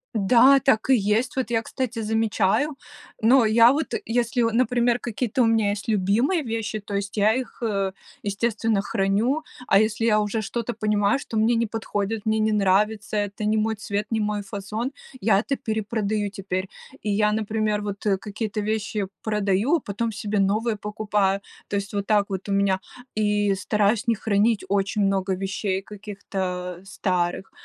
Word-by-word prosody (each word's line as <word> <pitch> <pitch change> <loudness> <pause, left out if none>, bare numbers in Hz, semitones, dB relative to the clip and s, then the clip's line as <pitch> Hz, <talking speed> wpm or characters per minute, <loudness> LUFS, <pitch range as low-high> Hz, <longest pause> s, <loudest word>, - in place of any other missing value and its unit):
Да, 240 +7 +6
так 265 -4 +2
и 265 - +7
есть. 210 +2 +1
Вот 260 -2 -2
я, 225 -1 +2
кстати, 240 0 -4
замечаю 220 +5 +1 0.4
но 240 +2 +5
я 230 +2 +6
вот 310 +3 -2
если, 240 +1 +1
вот, 230 -1 +1
например, 245 0 +2
какие-то 240 +1 -1
у - - +5
меня 225 -2 +2
есть 205 0 -5
любимые 220 - +2
вещи, 225 -2 -3
то 205 0 -9
есть 200 +1 -3
я 210 +1 +4
их, 255 +1 -4
э, 200 -4 0 0.3
естественно 215 0 0
храню, 205 +10 0 0.2
а 195 - +5
если 220 +1 +1
я 215 -2 +4
уже 210 +1 -1
что-то 235 +2 -3
понимаю, 210 0 +1
что 230 - -7
мне 225 +2 +3
не 230 0 +2
подходит, 215 -1 -3
мне 220 0 +1
не 215 0 +2
нравится, 210 +1 +1
это 205 0 -2
не 215 +1 +2
мой 220 +1 +1
цвет, 205 -1 -3
не 225 - +1
мой 210 0 -1
фасон- 205 +5 -4 0.3
я 200 -1 +4
это 275 +6 -1
перепродаю 215 -1 -2
теперь. 190 -1 -4 0.3
И 215 - -3
я, 210 +1 +2
например, 215 -1 0
вот 205 0 -5 0.2
какие-то 215 0 -4
вещи 210 -1 -2 0.2
продаю, 210 - +1
потом 225 -1 -3
себе 210 -1 -2
новые 215 +3 +1
покупаю, 205 -1 0 0.3
то - - -3
есть 200 +1 -5
вот 200 -1 -1
так 210 -2 +3
вот 190 0 -4
у - - -3
меня, 195 -1 +2 0.4
и 210 -1 +2
стараюсь 210 +4 +1
не 230 - +3
хранить 215 +1 +1
очень 200 +2 0
много 195 -1 +1
вещей 195 0 -2
каких-то 190 -3 -5
старых. 185 -2 -2
210 Hz, 170 wpm, -24 LUFS, 200-225 Hz, 0.4 s, и